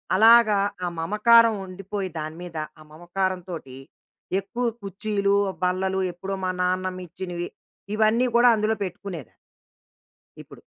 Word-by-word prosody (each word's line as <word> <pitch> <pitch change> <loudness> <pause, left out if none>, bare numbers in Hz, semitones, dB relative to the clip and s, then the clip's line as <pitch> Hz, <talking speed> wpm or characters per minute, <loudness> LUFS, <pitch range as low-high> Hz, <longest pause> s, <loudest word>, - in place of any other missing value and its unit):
అలాగా 220 0 +7 0.3
ఆ - - 0
మమకారం 225 +6 +5
ఉండిపోయి 195 +1 -5
దాని 155 +1 -5
మీద 170 -2 -8 0.2
ఆ - - -13
మమకారం 180 +3 -2
తోటి 135 -7 -7 0.6
ఎక్కువ 235 +5 -4 0.2
కుర్చీలు, 200 0 0 0.3
బల్లలు 190 +1 0
ఎప్పుడో 195 +3 -5
మా 185 - +1
నాన్నమ్మ 185 0 -1
ఇచ్చినవి. 175 0 -5 0.5
ఇవన్నీ 220 +3 +3
కూడా 245 +1 +7
అందులో 215 +1 +1
పెట్టుకునేది. 175 - -7 1.1
ఇప్పుడు. - - -13
190 Hz, 115 wpm, -24 LUFS, 180-215 Hz, 1.1 s, అలాగా